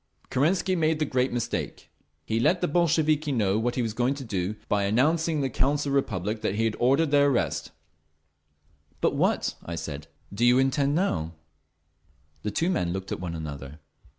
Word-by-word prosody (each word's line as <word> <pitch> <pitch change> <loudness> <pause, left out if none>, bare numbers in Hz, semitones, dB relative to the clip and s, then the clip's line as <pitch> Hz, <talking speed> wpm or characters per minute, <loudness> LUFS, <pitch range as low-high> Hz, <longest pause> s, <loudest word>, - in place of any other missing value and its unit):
Kerensky 180 +7 +2
made 160 -2 +2
the 155 - 0
great 130 -1 0
mistake. 120 -2 -4 0.3
He 110 +5 0
let 175 +9 +3
the - - +2
Bolsheviki 155 -2 +2
know 105 -5 +1
what 120 +2 -1
he 125 - 0
was 110 -2 -2
going 125 +4 +1
to 140 - -7
do 100 -2 -2
by 100 -1 +1
announcing 155 +10 +2
in 150 - 0
the 135 - 0
Council 145 +2 0
of - - -1
the - - +2
Republic 110 -4 -1
that 95 - -1
he 110 - 0
had 110 -1 0
ordered 140 +5 +3
their 145 -1 +5
arrest…. 135 -4 0 1.3
"But - - +2
what," - - +1
I 85 - -5
said, 75 -2 -6 0.3
"do 105 +4 -2
you 120 +1 +6
intend 135 +2 +2
to 175 - +3
do - - +3
now?" 80 0 -3 1.1
The 105 - -2
two 165 - 0
men 90 - 0
looked 95 +1 -5
at - - -3
one 85 -2 -4
another. 75 -2 -7
125 Hz, 200 wpm, -26 LUFS, 100-150 Hz, 1.3 s, you